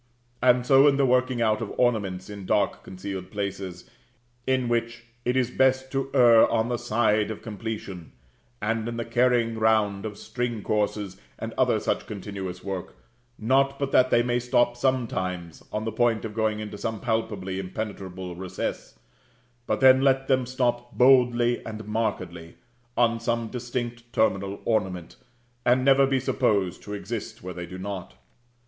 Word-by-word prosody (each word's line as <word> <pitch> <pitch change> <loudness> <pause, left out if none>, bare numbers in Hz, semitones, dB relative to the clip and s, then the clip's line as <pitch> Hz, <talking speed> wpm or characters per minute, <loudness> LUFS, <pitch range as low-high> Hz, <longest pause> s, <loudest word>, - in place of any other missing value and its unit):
And 125 -1 +4
so 135 +2 +6
in 140 -1 +4
the 140 - +3
working 125 -1 +2
out 110 0 +1
of 110 - -4
ornaments 100 -7 0
in 100 -2 -8
dark 105 -2 +1
concealed 95 0 -7
places, 95 -3 -5 0.6
in 130 -2 +1
which 115 0 -1 0.2
it 125 +1 +1
is 125 -2 +1
best 130 0 +2
to 135 0 -2
err 120 -3 +7
on 115 +1 +1
the 120 - 0
side 110 -2 +1
of 110 - -6
completion; 105 -5 -6 0.5
and 115 +1 -1
in 115 - -5
the 115 - -3
carrying 115 -1 +2
round 110 -2 +2
of 105 -1 -8
string 120 -4 -4
courses, 105 -2 -1 0.2
and - - -5
other - - +2
such - - -2
continuous 95 -3 -6
work; 95 -2 -5 0.4
not 135 +4 +2
but 140 -1 -2
that 130 0 +5
they 120 - +4
may 120 0 +1
stop 120 0 +2
sometimes, 95 - -2
on 105 +1 -3
the 110 - -2
point 115 0 +1
of 110 - -5
going 110 -1 0
into 105 -1 -6
some 110 0 -3
palpably 105 -5 -2
impenetrable 95 -2 -6
recess, 90 -7 -5 0.7
but - - 0
then 130 0 +7
let 135 -1 +2
them 130 -2 +2
stop 120 -1 -1
boldly 120 -2 +4
and 110 -1 -7
markedly, 95 -6 -3 0.4
on 115 -1 +3
some 115 -1 -1
distinct 120 -1 -5
terminal 100 -2 0
ornament, 95 -6 -1 0.5
and 130 +1 +3
never 135 0 +5
be 135 -1 +1
supposed 100 -8 0
to 105 - -9
exist 100 - -6
where 90 0 -5
they 90 0 -6
do 95 - -8
not. 95 -8 -6
110 Hz, 160 wpm, -26 LUFS, 100-125 Hz, 0.7 s, err